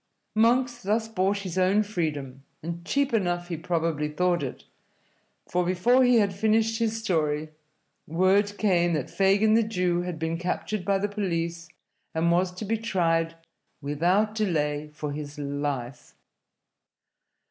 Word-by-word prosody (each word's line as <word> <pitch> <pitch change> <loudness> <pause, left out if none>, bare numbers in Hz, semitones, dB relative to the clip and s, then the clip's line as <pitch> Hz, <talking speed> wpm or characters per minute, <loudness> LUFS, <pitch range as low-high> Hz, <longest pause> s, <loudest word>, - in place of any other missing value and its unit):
Monks 240 +2 +2
thus 220 +3 0
bought 200 -2 0
his 185 0 -2
own 190 +3 +3
freedom, 150 -10 -3 0.2
and 170 +1 -5
cheap 280 +7 0
enough 175 -4 0
he 170 - -2
probably 165 -2 -1
thought 175 +3 +1
it, 135 -3 -5 0.8
for 180 0 0
before 185 +9 +3
he 250 -1 +5
had 205 -4 +3
finished 220 +3 +1
his 225 -1 0
story, 155 -8 -1 0.6
word 195 +5 +2
came 175 -5 +2
that 150 -5 -2
Fagin 200 +3 +3
the 225 - +5
Jew 180 -5 0
had 175 -2 -4
been 160 +1 -2
captured 180 +3 -2
by 195 +2 +2
the 200 +2 -1
police 170 -5 -3 0.5
and 165 +1 +2
was 180 +1 +2
to 185 +4 -7
be 220 +2 -1
tried 165 -6 0 0.4
without 175 +9 +1
delay 150 -8 -1
for 150 0 -5
his 145 0 -6
life. 140 -4 -4
180 Hz, 145 wpm, -26 LUFS, 160-210 Hz, 0.8 s, he